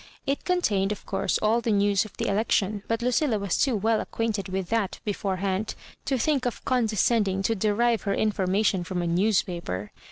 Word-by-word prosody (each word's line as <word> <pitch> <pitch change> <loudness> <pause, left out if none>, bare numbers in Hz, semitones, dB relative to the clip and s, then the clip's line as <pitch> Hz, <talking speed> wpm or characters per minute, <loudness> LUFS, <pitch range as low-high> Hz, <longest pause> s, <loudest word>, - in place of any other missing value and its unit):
It 275 +1 -2
contained, 210 - +1
of 210 - -5
course, - - 0
all 225 +3 +3
the 230 - -2
news 205 -1 +3
of 215 - -13
the - - -2
elec 210 +3 0
tion, 205 0 +1
but 230 +1 -1
Lucilla 250 -1 +2
was 200 -3 -1
too 260 -4 +2
well 220 +2 +1
acquainted 220 -4 -2
with 190 -2 -3
that 225 -4 -1
beforehand 195 0 -2 0.3
to 270 - +1
think 270 0 +1
of 245 - -5
condescending 220 -5 +1
to 225 - +2
derive 220 +3 +1
her 200 - +1
information 195 -2 +1
from 175 +1 -3
a - - -1
newspaper. 170 - 0
210 Hz, 185 wpm, -26 LUFS, 190-230 Hz, 0.3 s, all